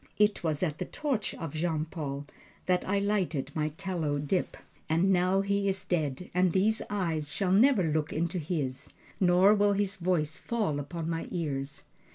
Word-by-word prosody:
It 210 Hz, -2 st, +3 dB
was 155 Hz, 0 st, 0 dB
at 155 Hz, -4 st, -1 dB
the -, -, -2 dB
torch 275 Hz, -8 st, -2 dB
of 165 Hz, -4 st, -6 dB
Jean 160 Hz, -1 st, -1 dB
Paul 145 Hz, -4 st, -5 dB, 0.4 s
that 180 Hz, -1 st, +2 dB
I 200 Hz, -, +2 dB
lighted 190 Hz, -9 st, 0 dB
my 155 Hz, -1 st, 0 dB
tallow 170 Hz, -7 st, -1 dB
dip, 145 Hz, +6 st, -1 dB, 0.3 s
and 175 Hz, +5 st, +3 dB
now 185 Hz, +2 st, +3 dB
he 200 Hz, 0 st, +1 dB
is 190 Hz, 0 st, -2 dB
dead 160 Hz, -3 st, -2 dB
and 180 Hz, -1 st, +3 dB
these 215 Hz, +4 st, +2 dB
eyes 165 Hz, -7 st, -1 dB
shall 185 Hz, +6 st, 0 dB
never 220 Hz, +1 st, +5 dB
look 155 Hz, -1 st, 0 dB
into 170 Hz, +3 st, -1 dB
his, 145 Hz, -5 st, -3 dB, 0.3 s
nor 185 Hz, +2 st, +5 dB
will 205 Hz, -1 st, +3 dB
his 200 Hz, -1 st, -1 dB
voice 170 Hz, -4 st, 0 dB
fall 210 Hz, -11 st, -1 dB
upon 165 Hz, +3 st, -5 dB
my 165 Hz, 0 st, -2 dB
ears. 140 Hz, -5 st, -3 dB
175 Hz, 175 wpm, -29 LUFS, 155-195 Hz, 0.4 s, never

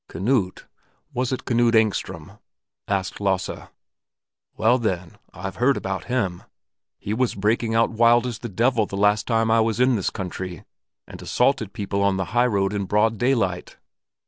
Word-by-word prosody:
"Knut? 95 Hz, +1 st, -1 dB, 0.5 s
Was 125 Hz, +1 st, -1 dB
it 130 Hz, -, -3 dB
Knut 120 Hz, -1 st, +2 dB
Engström?" 110 Hz, -2 st, -1 dB, 0.5 s
asked 95 Hz, -1 st, -2 dB
Lasse. 95 Hz, -2 st, -1 dB, 0.9 s
"Well, 120 Hz, +4 st, +3 dB
then, 90 Hz, -7 st, -3 dB
I've 95 Hz, +2 st, -7 dB
heard 135 Hz, +3 st, +3 dB
about 95 Hz, 0 st, -4 dB
him. 105 Hz, -9 st, -1 dB, 0.6 s
He 105 Hz, -, -4 dB
was 125 Hz, +2 st, 0 dB
breaking 110 Hz, +3 st, 0 dB
out 115 Hz, 0 st, +3 dB
as 110 Hz, -, -10 dB
wild 120 Hz, +1 st, +5 dB
as 120 Hz, -3 st, -4 dB
the 120 Hz, -, -6 dB
devil 115 Hz, +2 st, +1 dB
the 100 Hz, -, -6 dB
last 105 Hz, +1 st, +2 dB
time 115 Hz, -1 st, +2 dB
I 115 Hz, -, +4 dB
was 115 Hz, 0 st, +1 dB
in 125 Hz, 0 st, +4 dB
this 100 Hz, -, -1 dB
country, 90 Hz, -3 st, -6 dB, 0.4 s
and -, -, -11 dB
assaulted -, -, +1 dB
people 100 Hz, 0 st, -3 dB
on 100 Hz, -1 st, +2 dB
the 95 Hz, -, -1 dB
high 120 Hz, +1 st, +4 dB
road 100 Hz, -3 st, 0 dB
in 100 Hz, -1 st, -2 dB
broad 105 Hz, +2 st, +1 dB
daylight. 110 Hz, -8 st, 0 dB
110 Hz, 170 wpm, -23 LUFS, 95-120 Hz, 0.9 s, wild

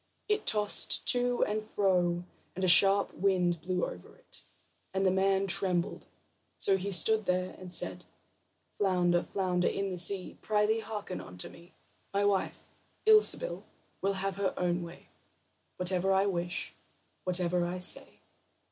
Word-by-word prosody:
It 425 Hz, 0 st, -1 dB
tossed 210 Hz, -1 st, +2 dB
to 245 Hz, 0 st, +2 dB
and 215 Hz, +1 st, -4 dB
fro, 180 Hz, -3 st, +1 dB, 0.3 s
and 190 Hz, -, -5 dB
a -, -, +2 dB
sharp 195 Hz, +3 st, +5 dB
wind 180 Hz, -3 st, 0 dB
blew 180 Hz, +1 st, -2 dB
over 90 Hz, -, -11 dB
it, -, -, -9 dB, 0.5 s
and 195 Hz, 0 st, 0 dB
the 185 Hz, -, +3 dB
man 195 Hz, +1 st, +1 dB
trembled. 185 Hz, -2 st, 0 dB, 0.5 s
So 195 Hz, -, +3 dB
he 190 Hz, +1 st, -4 dB
stood 215 Hz, +4 st, +5 dB
there, 180 Hz, 0 st, -1 dB
and 185 Hz, -1 st, -10 dB
said: -, -, 0 dB, 0.8 s
"Flounder, 180 Hz, -3 st, +1 dB
flounder 180 Hz, -2 st, -1 dB
in 195 Hz, -1 st, -2 dB
the 180 Hz, -, -5 dB
sea, 185 Hz, +2 st, +2 dB
Prythee, 215 Hz, +1 st, 0 dB
hearken 210 Hz, -4 st, -7 dB
unto 90 Hz, 0 st, -10 dB
me: 170 Hz, +2 st, -17 dB, 0.4 s
My 200 Hz, 0 st, +1 dB
wife, 200 Hz, -2 st, 0 dB, 0.5 s
Ilsebil, 435 Hz, +3 st, +3 dB, 0.4 s
will 195 Hz, 0 st, 0 dB
have 195 Hz, 0 st, -4 dB
her 200 Hz, -1 st, -2 dB
own 175 Hz, 0 st, -1 dB
way 170 Hz, 0 st, -11 dB, 0.7 s
Whatever 185 Hz, +1 st, +1 dB
I 190 Hz, +1 st, +2 dB
wish, 175 Hz, -2 st, -4 dB, 0.5 s
whatever 180 Hz, -1 st, 0 dB
I 175 Hz, +1 st, -4 dB
say." 180 Hz, -, +1 dB
190 Hz, 145 wpm, -29 LUFS, 180-200 Hz, 0.8 s, sharp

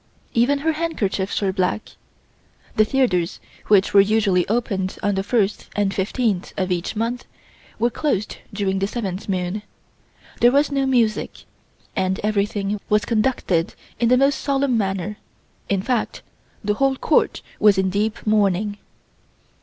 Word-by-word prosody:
Even 245 Hz, +5 st, +3 dB
her 320 Hz, -, +4 dB
handkerchiefs 230 Hz, -, -1 dB
were 190 Hz, -1 st, +1 dB
black. 185 Hz, +3 st, -1 dB, 0.9 s
The 215 Hz, -, +5 dB
theatres 215 Hz, -10 st, +1 dB, 0.3 s
which 200 Hz, -2 st, +4 dB
were 200 Hz, -, +8 dB
usually 200 Hz, -3 st, +2 dB
opened 200 Hz, -4 st, -1 dB
on 205 Hz, -, +2 dB
the 195 Hz, -, 0 dB
first 205 Hz, 0 st, 0 dB
and 200 Hz, -1 st, +1 dB
fifteenth 200 Hz, -1 st, -1 dB
of 185 Hz, -1 st, -1 dB
each 175 Hz, +3 st, -2 dB
month, 230 Hz, +3 st, -2 dB, 0.5 s
were 235 Hz, +2 st, +1 dB
closed 215 Hz, -6 st, -1 dB
during 195 Hz, -2 st, -1 dB
the 195 Hz, -, 0 dB
seventh 200 Hz, -4 st, -4 dB
moon. 185 Hz, +2 st, -1 dB, 0.8 s
There 240 Hz, -, +6 dB
was 285 Hz, +2 st, +3 dB
no 275 Hz, -1 st, +1 dB
music, 230 Hz, -5 st, 0 dB, 0.5 s
and 190 Hz, -1 st, 0 dB
everything 205 Hz, -1 st, 0 dB
was 210 Hz, 0 st, +3 dB
conducted 215 Hz, -7 st, 0 dB, 0.2 s
in 235 Hz, -1 st, +3 dB
the 250 Hz, -, +5 dB
most 275 Hz, +2 st, +3 dB
solemn 275 Hz, -2 st, +1 dB
manner; 195 Hz, -1 st, -1 dB, 0.5 s
in 195 Hz, -1 st, 0 dB
fact, 245 Hz, -2 st, -1 dB, 0.4 s
the 210 Hz, 0 st, +1 dB
whole 270 Hz, +4 st, +2 dB
Court -, -, +1 dB, 0.2 s
was 210 Hz, -2 st, +5 dB
in 190 Hz, -1 st, +1 dB
deep 210 Hz, +2 st, -1 dB
mourning. 205 Hz, -1 st, +1 dB
210 Hz, 145 wpm, -22 LUFS, 195-240 Hz, 0.9 s, were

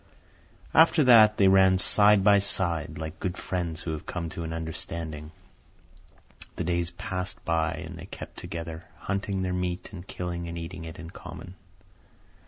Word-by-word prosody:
After 160 Hz, -1 st, +6 dB
that 110 Hz, -4 st, +7 dB
they 100 Hz, -, +5 dB
ran 95 Hz, -1 st, +5 dB
side 105 Hz, +1 st, +5 dB
by 100 Hz, 0 st, +6 dB
side, 85 Hz, -5 st, +1 dB
like 80 Hz, 0 st, -6 dB
good 90 Hz, -1 st, -3 dB
friends 85 Hz, -3 st, -3 dB
who 80 Hz, -, -3 dB
have 80 Hz, -, -6 dB
come 85 Hz, -2 st, -4 dB
to 85 Hz, -, -6 dB
an 80 Hz, -, -5 dB
understanding. 80 Hz, -1 st, -6 dB, 1.2 s
The -, -, -3 dB
days 85 Hz, 0 st, 0 dB
passed 90 Hz, +1 st, -5 dB
by, 80 Hz, -1 st, +1 dB
and -, -, -9 dB
they -, -, -9 dB
kept -, -, -9 dB
together, 80 Hz, 0 st, -7 dB
hunting 100 Hz, -1 st, -2 dB
their 90 Hz, -1 st, -1 dB
meat 90 Hz, +1 st, -3 dB
and 90 Hz, -1 st, -9 dB
killing 85 Hz, -1 st, -5 dB
and 85 Hz, 0 st, -6 dB
eating 85 Hz, 0 st, -7 dB
it 80 Hz, -, -8 dB
in 85 Hz, -1 st, -9 dB
common. 90 Hz, 0 st, -10 dB
90 Hz, 165 wpm, -27 LUFS, 80-95 Hz, 1.2 s, that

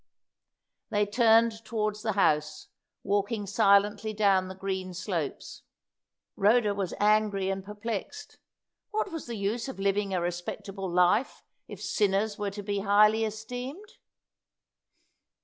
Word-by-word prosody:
They 205 Hz, 0 st, +1 dB
turned 225 Hz, +1 st, +3 dB
towards 215 Hz, -2 st, -2 dB
the 220 Hz, -1 st, -1 dB
house, 150 Hz, -6 st, +1 dB, 0.3 s
walking 205 Hz, +2 st, -1 dB
silently 205 Hz, +2 st, +3 dB
down 195 Hz, -3 st, +2 dB
the 190 Hz, -, -8 dB
green 190 Hz, -1 st, -4 dB
slopes. 175 Hz, -5 st, -4 dB, 0.7 s
Rhoda 210 Hz, +1 st, +3 dB
was 195 Hz, -3 st, -3 dB
angry 205 Hz, -2 st, +2 dB
and 195 Hz, 0 st, -4 dB
perplexed; 210 Hz, -, -6 dB, 0.5 s
what 430 Hz, -2 st, -2 dB
was 325 Hz, -5 st, -6 dB
the 235 Hz, -, -4 dB
use 210 Hz, +5 st, -2 dB
of 265 Hz, -, -7 dB
living 200 Hz, 0 st, 0 dB
a 185 Hz, -, 0 dB
respectable 190 Hz, +3 st, -4 dB
life 180 Hz, +7 st, +2 dB, 0.2 s
if -, -, -9 dB
sinners 205 Hz, 0 st, 0 dB
were 205 Hz, -1 st, -1 dB
to 205 Hz, +1 st, -7 dB
be 200 Hz, 0 st, -2 dB
highly 210 Hz, +2 st, +4 dB
esteemed? 250 Hz, -, -7 dB
205 Hz, 125 wpm, -28 LUFS, 195-220 Hz, 0.7 s, highly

